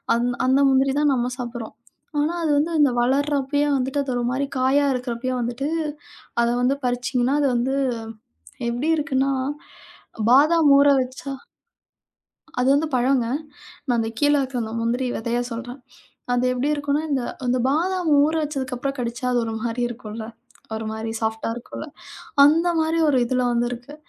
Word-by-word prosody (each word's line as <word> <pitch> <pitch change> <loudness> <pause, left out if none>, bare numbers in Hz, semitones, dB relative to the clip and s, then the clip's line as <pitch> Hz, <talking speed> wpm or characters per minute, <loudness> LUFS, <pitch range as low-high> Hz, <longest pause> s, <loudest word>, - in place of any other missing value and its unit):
அந் 240 +1 +1 0.2
அந்த 265 +2 +4
முந்திரிதான் 275 +2 +3
நம்ம 245 0 0
சாப்பிடுறோம். 240 -2 -6 0.4
ஆனா, 300 +3 +1
அது 305 - +1
வந்து 315 +4 +1
அந்த 290 -3 +5
வளரப்பயே 285 +3 +1
வந்துட்டு, 265 +2 -1
அது 270 - -4
ஒரு 240 - -1
மாதிரி 275 +2 0
காயா 265 +3 +3
இருக்கப்பயே 250 0 -3
வந்துட்டு 240 +4 -2 0.7
அத 235 - +3
வந்து 255 +3 +2
பறிச்சீங்கன்னா, 250 +2 0
அது 285 - +3
வந்து 255 +3 0 0.9
எப்படி 245 +7 -1
இருக்குன்னா, 275 -3 0 1.0
பாதாம் 300 +4 +5
ஊற 280 +1 +5
வச்சா 260 +2 -5 1.3
அது 250 - +2
வந்து 305 +3 +2
பழங்க. 250 0 +2 0.6
நான் 245 - +2
அந்த 225 0 -1
கீழ 290 0 +4
இருக்குற 265 -2 -2
அந்த 220 0 -6
முந்திரி 240 +3 0
வெதைய 235 +2 -1
சொல்றேன். 245 +3 -6 0.5
அது 245 0 +1
எப்படி 255 +4 -1
இருக்கும்னா, 290 +1 0
இந்த 270 -3 +1 0.2
இந்த 250 +1 +2
பாதாம் 345 +4 0
ஊற 310 - +1
வச்சதுக்கப்புறம் 275 -1 -3
கடிச்சா, 235 +1 -3
அது 245 - +2
ஒரு 225 - -3
மாதிரி 235 +1 -2
இருக்கும்ல்ல 225 -2 -7 0.5
ஒரு 220 0 -4
மாரி 220 +1 -4
சாஃப்ட்டா 220 0 -2
இருக்கும்ல்ல. 245 +5 -8 0.6
அந்த 330 +4 +4
மாதிரி 320 +1 +1
ஒரு 270 -3 +3
இதுல 250 +1 0
வந்து 240 0 +1
இருக்கு. 245 +4 -8
260 Hz, 150 wpm, -23 LUFS, 240-285 Hz, 1.3 s, அந்த